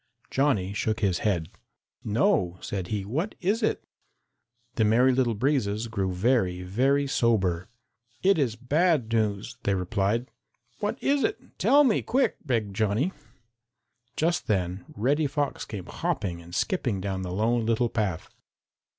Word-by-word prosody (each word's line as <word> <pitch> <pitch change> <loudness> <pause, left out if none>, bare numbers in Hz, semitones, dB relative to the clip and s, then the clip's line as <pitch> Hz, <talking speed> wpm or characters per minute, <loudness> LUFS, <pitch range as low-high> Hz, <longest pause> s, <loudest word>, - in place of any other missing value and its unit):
Johnny 110 -9 +1
shook 110 +2 -1
his 95 -4 +1
head. 90 -7 0 0.6
"No," 95 -4 +1
said 95 -3 -4
he. 100 -1 -2
"What 155 - -2
is 205 +6 0
it?" 220 - 0 0.9
The 110 - +1
Merry 120 +5 +4
Little 125 -3 +1
Breezes 115 -3 0
grew 95 -4 -1
very, 90 -2 +1
very 135 +10 +2
sober. 95 -9 +1 0.5
"It 195 -2 +4
is 125 -6 +1
bad 135 -1 +1
news," 105 -3 -1
they 100 - +1
replied. 100 +6 -1 0.5
"What 210 +3 -1
is 280 0 +2
it? 420 - 0 0.2
Tell 290 +1 +6
me 240 -7 +3
quick!" 265 +2 +1
begged 115 - -1
Johnny. 110 - +1 1.1
Just 170 +2 0
then 90 -3 -1
Reddy 145 +8 +1
Fox 145 0 -2
came 100 -5 -7
hopping 85 -4 -3
and 85 +1 -10
skipping 125 - 0
down 95 0 -3
the 90 -1 -4
Lone 115 +5 +1
Little 115 +1 +2
Path. 105 -8 -2
110 Hz, 140 wpm, -27 LUFS, 95-140 Hz, 1.1 s, Tell